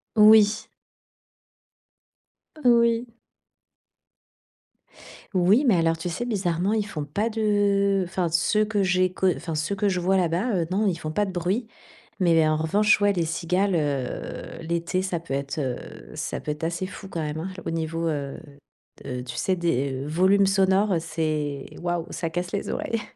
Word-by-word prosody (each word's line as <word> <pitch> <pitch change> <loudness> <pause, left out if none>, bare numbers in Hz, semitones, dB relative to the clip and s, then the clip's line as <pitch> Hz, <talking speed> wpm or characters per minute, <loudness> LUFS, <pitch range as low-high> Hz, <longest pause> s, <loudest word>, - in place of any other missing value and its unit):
Oui. 215 0 +6 2.0
Oui. 235 -1 +3 2.2
Oui, 190 +8 +4
mais 220 - +5
alors, 165 0 +2
tu 165 +2 -4
sais, 205 +8 -3
bizarrement, 190 -3 0
ils 215 -2 0
font 150 -6 -5
pas 205 +10 -1
de 200 -3 +2
enfin, 180 -1 -1
ceux 190 +6 +2
que 210 -2 0
j'ai 185 0 +2
co 190 - +1
enfin, 165 -2 -5
ceux 155 +6 -1
que 200 +1 +1
je 185 -2 0
vois 190 +2 +2
là-bas, 185 +6 +1
heu, - - -1
non, 205 +3 +1
ils 185 - +1
font 155 -1 -5
pas 205 +6 +1
de 195 - -5
bruit. 185 +6 -1 0.5
Mais 175 -2 +3
mais 160 -1 +4
en 155 - +2
revanche, 205 +7 +3
ouais, 205 - +4
les 175 -3 0
cigales, 180 +4 0
heu, 145 +1 -3
l'été, 170 +2 -1
ça 185 -3 -2
peut 165 -5 -7
être, 140 +1 -3
heu, 125 - -5
ça - - -4
peut 150 - -4
être 150 +1 -7
assez 170 +3 -2
fou 195 - -10
quand 170 - -4
même, 150 0 -3
hein, 175 +4 -4 0.2
au - - -2
niveau, 165 0 -2
heu 140 -3 -3 0.7
heu, 125 -1 -4
tu 125 -1 -7
sais, 190 - +1
des, 140 -6 0
heu, - - -6
volumes 190 +5 +4
sonores, 190 0 +3
c'est 155 -4 -2 0.2
waouh! 175 -1 -1
Ça 165 - -3
casse 175 +2 -3
les 200 - -3
oreilles. 230 -1 -2
180 Hz, 175 wpm, -25 LUFS, 160-200 Hz, 2.2 s, Oui